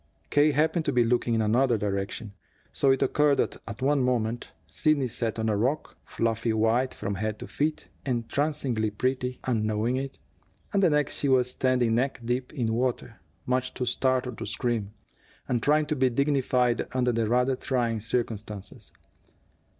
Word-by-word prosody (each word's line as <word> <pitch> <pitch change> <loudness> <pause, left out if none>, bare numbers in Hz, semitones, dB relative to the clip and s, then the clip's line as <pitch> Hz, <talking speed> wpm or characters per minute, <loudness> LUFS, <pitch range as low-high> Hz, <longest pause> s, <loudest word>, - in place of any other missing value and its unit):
K. 145 +1 +5
happened 160 +3 +2
to 145 - +1
be 125 -2 +3
looking 120 0 +1
in 110 - +2
another 120 +3 +3
direction. 100 +1 -3 0.4
So 140 - +2
it 135 0 +3
occurred 150 -1 +3
that - - 0
at 110 +4 -6
one 140 0 +3
moment, 120 -2 0 0.2
Sidney 150 - +1
sat 115 -1 -2
on 110 0 -1
a 110 - +2
rock, 130 +9 -1
fluffy 115 0 -1
white 115 +4 +2
from 100 - -3
head 110 +2 -2
to - - -7
feet, 150 +1 -2 0.2
entrancingly 125 -2 -1
pretty, 125 +3 -2
and 115 -4 0
knowing 110 +4 0
it, 135 0 -4 0.6
and 200 - +3
the 185 - +5
next 150 -1 +1
she 140 - 0
was 125 -1 +3
standing 125 -3 +1
neck 130 +3 0
deep 125 +2 -1
in 120 -6 -1
water, 120 -1 -2 0.2
much 130 0 -1
too 125 - -2
startled 125 0 0
to - - -4
scream, 115 -5 -2 0.6
and 120 -2 0
trying 150 +1 +3
to 150 - -1
be 130 -2 +3
dignified 125 -2 +1
under 125 -1 +2
the 115 -2 0
rather 125 +2 +2
trying 120 -4 -1
circumstances. 105 -3 -4
125 Hz, 170 wpm, -27 LUFS, 115-135 Hz, 0.6 s, K